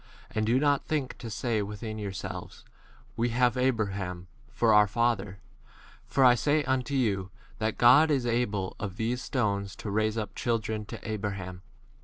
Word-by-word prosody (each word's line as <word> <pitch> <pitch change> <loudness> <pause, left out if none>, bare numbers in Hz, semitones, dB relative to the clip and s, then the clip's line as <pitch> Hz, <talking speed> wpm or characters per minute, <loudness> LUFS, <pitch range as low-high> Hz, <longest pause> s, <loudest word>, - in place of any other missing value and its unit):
And 110 0 -1
do 120 +3 +3
not 145 -1 +2
think 145 -5 -1
to 120 -2 -6
say 115 0 -1
within 105 +2 -5
your 100 -2 -4
selves, 95 - -7 0.5
We 120 +1 0
have 120 +1 +2
Abraham 100 -8 -1 0.3
for 115 -2 +3
our 105 0 +6
father; 105 -3 0 0.7
for 135 - +2
I 125 - +8
say 145 +5 +1
unto 130 0 -1
you, 100 -7 0 0.3
that 110 0 -1
God 135 +7 +7
is 135 -5 +1
able 110 -5 -1
of 100 -2 -5
these 120 +2 -1
stones 100 -6 -1
to 105 - -6
raise 110 +1 +1
up 105 -3 -3
children 110 -2 -2
to - - -8
Abraham. 100 -4 -4
110 Hz, 165 wpm, -28 LUFS, 100-125 Hz, 0.7 s, I